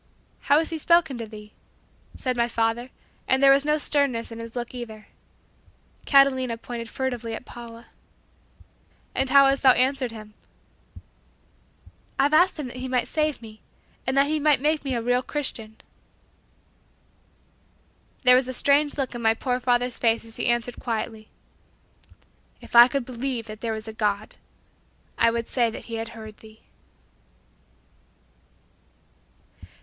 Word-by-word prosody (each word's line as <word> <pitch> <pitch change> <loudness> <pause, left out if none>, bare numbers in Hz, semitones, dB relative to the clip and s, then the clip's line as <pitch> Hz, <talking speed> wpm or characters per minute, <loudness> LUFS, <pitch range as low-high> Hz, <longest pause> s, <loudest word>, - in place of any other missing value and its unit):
"How 285 - +6
has 320 +1 0
He 325 - -3
spoken 315 -6 +2
to 230 - -5
thee?" 210 -1 -12 0.6
said 255 -1 -2
my 235 0 +1
father, 230 +1 -1 0.4
and 265 +1 +2
there 275 - +8
was 275 0 +4
no 300 +1 +1
sternness 280 -6 0
in 230 - -8
his 230 0 -9
look 240 0 -5
either. 220 -4 -9 1.0
Catalina 260 -4 +4
pointed 230 0 -7
furtively 240 -4 -3
at 250 - -9
Paula. 235 -1 -11 1.3
"And 265 0 0
how 275 +1 +7
hast 275 0 +2
thou 260 -2 +7
answered 260 -1 +1
Him?" 215 -1 -11 1.8
"I've 285 +2 +2
asked 355 +4 +4
Him 300 - -4
that 250 - -10
He 255 +1 -5
might 250 -1 0
save 305 -5 -1
me 215 -1 -13 0.5
and 260 +1 0
that 275 - +5
He 305 +1 -1
might 300 -2 +3
make 300 +2 0
me 270 -3 -2
a 235 - -2
real 245 +1 +2
Christian." 230 -6 -5 2.5
There 250 -1 +7
was 255 0 +2
a 255 - -4
strange 285 +3 +2
look 270 -3 -2
in 240 - -6
my 225 -1 +3
poor 250 +1 -2
father's 245 0 0
face 230 -1 +1
as 225 0 -13
he 240 - -1
answered 240 0 -1
quietly, 225 -2 -4 1.3
"If - - -11
I 240 +1 +10
could 275 -1 -3
believe 250 -1 -4
that 215 -1 -10
there 230 - -2
was 220 0 -6
a 220 - -7
God, 210 -1 -2 0.8
I 230 - +5
would 230 0 -3
say 240 -3 +1
that 225 - -8
He 230 -1 -6
had 225 +1 -6
heard 220 -1 -10
thee." 220 0 -16
245 Hz, 155 wpm, -24 LUFS, 230-275 Hz, 2.5 s, I